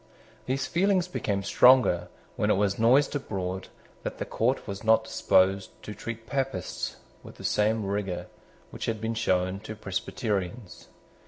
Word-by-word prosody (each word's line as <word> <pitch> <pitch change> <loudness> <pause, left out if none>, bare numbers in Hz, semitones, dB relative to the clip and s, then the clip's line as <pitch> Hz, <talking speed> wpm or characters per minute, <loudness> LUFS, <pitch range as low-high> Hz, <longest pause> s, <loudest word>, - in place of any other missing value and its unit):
These 135 +1 0
feelings 185 0 +2
became 100 - -2
stronger 100 -6 +5 0.3
when - - 0
it - - +4
was 100 0 +1
noised 130 +6 +4
abroad 95 -8 -3 0.3
that - - -5
the - - -3
court 125 +4 0
was 100 0 -5
not 110 0 +4
disposed 95 -3 +2
to 105 - -6
treat 110 +2 -7
Papists 135 - -3 0.3
with - - -12
the - - -12
same 105 0 +1
rigour 100 -2 -2 0.5
which - - -5
had 110 -1 -1
been 115 +1 -2
shown 95 -4 0
to 110 +1 -8
Presbyterians. 100 0 -4
110 Hz, 150 wpm, -27 LUFS, 95-120 Hz, 0.5 s, stronger